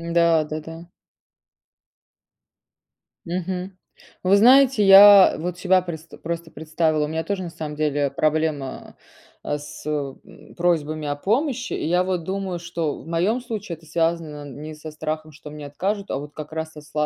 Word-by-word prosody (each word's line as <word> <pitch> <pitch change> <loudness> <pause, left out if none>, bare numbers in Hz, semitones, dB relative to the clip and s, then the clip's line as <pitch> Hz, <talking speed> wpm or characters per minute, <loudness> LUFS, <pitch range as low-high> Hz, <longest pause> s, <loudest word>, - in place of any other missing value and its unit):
Да-да-да. 165 0 0 2.4
Мгм. 180 +2 -4 0.5
Вы 190 +2 +5
знаете, 255 +1 +6
я 195 0 +9
вот 175 +2 -4
себя 185 0 +3
предста 165 -2 -8
просто 170 -1 -5
представила. 155 0 0
У - - -5
меня 160 +1 -3
тоже, 200 0 -3
на 175 - -5
самом 155 -2 -6
деле, 145 -2 0
проблема, 155 -3 -2 0.5
а, 145 - -2
с 145 0 -11
м, 145 -3 -6
просьбами 155 -3 0
о 145 - -1
помощи. 250 - -1
И - - -2
я 180 +2 +2
вот 185 -2 -2
думаю, 190 0 -3
что 165 -3 -3
в - - -15
моём 180 +9 0
случае 215 -8 -6
это 160 - -20
связано 165 -2 -1
не 150 +3 -8
со 155 +1 -9
страхом, 155 0 -5
что 150 0 -12
мне 150 0 -9
откажут, 195 +8 -3
а - - -1
вот 145 +1 -9
как 150 +1 -8
раз 160 0 -4
со 150 - -11
с 150 +1 -19
165 Hz, 160 wpm, -23 LUFS, 155-185 Hz, 2.4 s, я